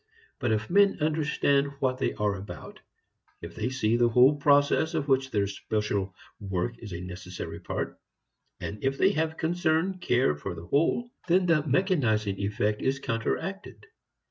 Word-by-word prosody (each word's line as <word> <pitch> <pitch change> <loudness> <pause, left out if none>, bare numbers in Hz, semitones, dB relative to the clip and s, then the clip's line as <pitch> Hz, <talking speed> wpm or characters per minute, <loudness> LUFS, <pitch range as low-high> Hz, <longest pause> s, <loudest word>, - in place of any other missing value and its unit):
But 120 -4 0
if 110 0 0
men 200 +2 +4
understand 150 -2 +1
what 130 -2 0
they - - -1
are 105 -1 0
about, 95 +1 -9 0.6
if - - -9
they 110 +3 -2
see 120 -4 +1
the 120 0 +4
whole 125 +5 +6
process 145 +3 +3
of 150 -3 -1
which 135 -1 +2
their 100 -5 +1
special 100 -1 -2 0.2
work 100 +3 -3
is 105 - -9
a 85 - -5
necessary 90 -2 -7
part, - - -4 0.6
and 105 - -6
if 135 +1 0
they 190 - +4
have 160 -3 -1
concern, 175 +2 0
care, 125 - +2
for 75 +4 -6
the 85 0 -9
whole, 165 - +1 0.2
then 180 +1 +3
the 165 -3 +3
mechanizing 130 - +1
effect 105 +1 -1
is 135 +1 +1
counteracted. 135 - -4
130 Hz, 160 wpm, -27 LUFS, 105-155 Hz, 0.6 s, whole